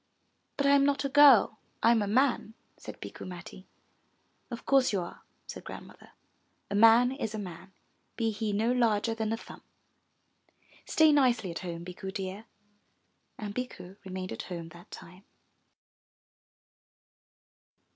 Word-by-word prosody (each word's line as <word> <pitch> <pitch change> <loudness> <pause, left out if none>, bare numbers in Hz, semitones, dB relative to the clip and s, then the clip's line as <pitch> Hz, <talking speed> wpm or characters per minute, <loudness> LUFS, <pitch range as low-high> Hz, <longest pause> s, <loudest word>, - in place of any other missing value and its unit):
But 280 - 0
I 280 - +5
am 280 -1 +5
not 280 0 +1
a - - 0
girl, 270 -7 +6 0.2
I 230 - +6
am 230 -2 +3
a 205 - -1
man," 240 -1 +1 0.2
said - - -11
Bikku - - -9
Matti. 180 +1 -10 0.8
*'0f 235 - -7
course 270 -2 +3
you 200 - 0
are," 175 - -9 0.2
said - - -9
Grandmother. - - -12 0.6
A - - -1
man 230 +4 +6
is 225 -6 -4
a - - -4
man, 185 -2 -8 0.4
be 225 -2 0
he 215 0 -3
no 220 +4 +1
larger 230 -3 +1
than 220 -1 -3
a 225 - -1
thumb. - - -12 1.3
Stay 315 -1 +5
nicely 250 -10 +2
at 170 - -5
home, 170 -2 -6
Bikku 190 +2 -7
dear." 195 +2 -6 0.9
And 205 -1 -6
Bikku 205 -6 -7
remained 185 -1 -6
at - - -5
home 170 -2 -6
that 170 +2 -15
time. 185 +3 -12
215 Hz, 145 wpm, -29 LUFS, 190-250 Hz, 1.3 s, girl